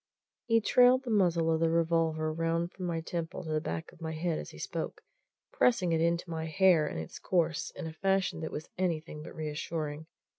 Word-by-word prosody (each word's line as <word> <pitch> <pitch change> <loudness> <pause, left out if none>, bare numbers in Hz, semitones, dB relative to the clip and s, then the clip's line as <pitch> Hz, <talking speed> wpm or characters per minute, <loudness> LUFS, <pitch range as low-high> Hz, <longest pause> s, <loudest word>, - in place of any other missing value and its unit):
He 230 -1 +4
trailed 250 +3 +5
the 245 - -4
muzzle 170 -5 +3
of 160 - +1
the 165 0 +3
revolver 165 -1 +1
round 165 +1 0
from 185 -1 -5
my 165 -1 -1
temple 170 +1 -4
to 160 - -5
the 155 0 +1
back 160 0 -4
of - - -20
my 160 -1 -3
head 160 0 -1
as - - -7
he - - -12
spoke, - - -5 0.5
pressing 235 - +3
it 160 -1 +2
into 170 +2 +1
my 160 -1 -3
hair 165 -2 +4
in - - -4
its 80 -1 -6
course 165 -3 0
in - - -6
a 160 - -5
fashion 195 0 +1
that 160 - -4
was 155 - -5
anything 165 -4 -2
but - - -10
reassuring. 155 0 -4
165 Hz, 210 wpm, -31 LUFS, 160-180 Hz, 0.5 s, trailed